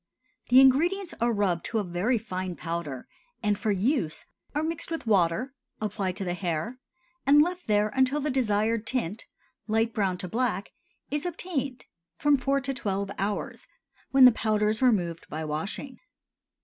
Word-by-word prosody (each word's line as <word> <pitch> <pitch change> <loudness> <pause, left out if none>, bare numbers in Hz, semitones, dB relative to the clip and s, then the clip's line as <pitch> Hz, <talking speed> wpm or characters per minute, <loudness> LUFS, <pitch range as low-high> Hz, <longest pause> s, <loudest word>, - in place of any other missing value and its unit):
The 250 +2 +8
ingredients 340 +8 +3
are 235 0 +3
rubbed 195 -6 0
to 230 - -2
a 215 - +1
very 185 +7 0
fine 185 -4 -4
powder 165 -7 -5 0.4
and 210 -1 +2
for 215 +2 -2
use 200 - 0 0.3
are 300 - +1
mixed 325 0 -1
with 330 -5 -4
water, 210 +5 +2 0.3
applied 195 -3 -2
to 195 - -3
the 175 - -1
hair, 180 +7 -3 0.5
and 290 +1 +7
left 355 +3 +1
there 210 0 +3
until 265 +3 +2
the 295 0 -1
desired 225 -3 +1
tint—light 225 +1 -3
brown 195 -4 0
to 180 - -5
black—is 240 +6 -4
obtained, 285 -7 -3 0.3
from 295 -1 +3
four 275 +2 +1
to 270 +1 -2
twelve 200 -5 -2
hours, 205 - -3 0.4
when 270 -1 +7
the 250 - +10
powder 215 -2 +1
is 215 +3 -1
removed 180 -10 +1
by 155 +1 -4
washing. 160 - -4
220 Hz, 155 wpm, -27 LUFS, 190-265 Hz, 0.5 s, the